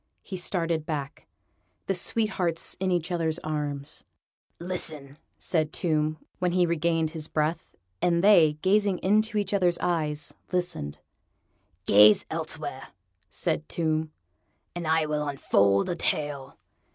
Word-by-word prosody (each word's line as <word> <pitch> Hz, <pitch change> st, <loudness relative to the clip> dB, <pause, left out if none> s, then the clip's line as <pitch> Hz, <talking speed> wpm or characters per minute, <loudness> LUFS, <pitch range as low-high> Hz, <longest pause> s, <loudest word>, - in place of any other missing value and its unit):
He 190 Hz, -, -7 dB
started 170 Hz, -3 st, 0 dB
back. 145 Hz, -3 st, -5 dB, 0.6 s
The 195 Hz, -, 0 dB
sweethearts 185 Hz, -3 st, -1 dB
were -, -, -3 dB
in 190 Hz, -, +1 dB
each 175 Hz, 0 st, -1 dB
other's 165 Hz, -2 st, 0 dB
arms. 145 Hz, -2 st, -4 dB, 0.5 s
"Listen," 160 Hz, -6 st, -3 dB, 0.2 s
said 155 Hz, -3 st, 0 dB
Tomb, 155 Hz, -2 st, 0 dB, 0.2 s
when 180 Hz, -1 st, 0 dB
he 180 Hz, -1 st, +4 dB
regained 165 Hz, -1 st, 0 dB
his 160 Hz, -2 st, -5 dB
breath; 155 Hz, +2 st, -2 dB, 0.3 s
and 170 Hz, 0 st, +2 dB
they, 175 Hz, -7 st, +6 dB
gazing 200 Hz, 0 st, +3 dB
into 215 Hz, +3 st, +2 dB
each 205 Hz, -1 st, -1 dB
other's 180 Hz, -3 st, +3 dB
eyes, 155 Hz, -3 st, -1 dB, 0.2 s
listened. 175 Hz, -, -2 dB, 0.9 s
"Gaze 105 Hz, +1 st, +7 dB
elsewhere," -, -, -5 dB, 0.4 s
said 160 Hz, -2 st, -1 dB
Tomb, 160 Hz, -1 st, -1 dB, 0.6 s
"and 175 Hz, -2 st, -4 dB
I 160 Hz, 0 st, +3 dB
will 150 Hz, -1 st, -2 dB
unfold 100 Hz, -8 st, +2 dB
a 175 Hz, -, -1 dB
tale." 145 Hz, -5 st, -2 dB
165 Hz, 130 wpm, -27 LUFS, 150-180 Hz, 0.9 s, Gaze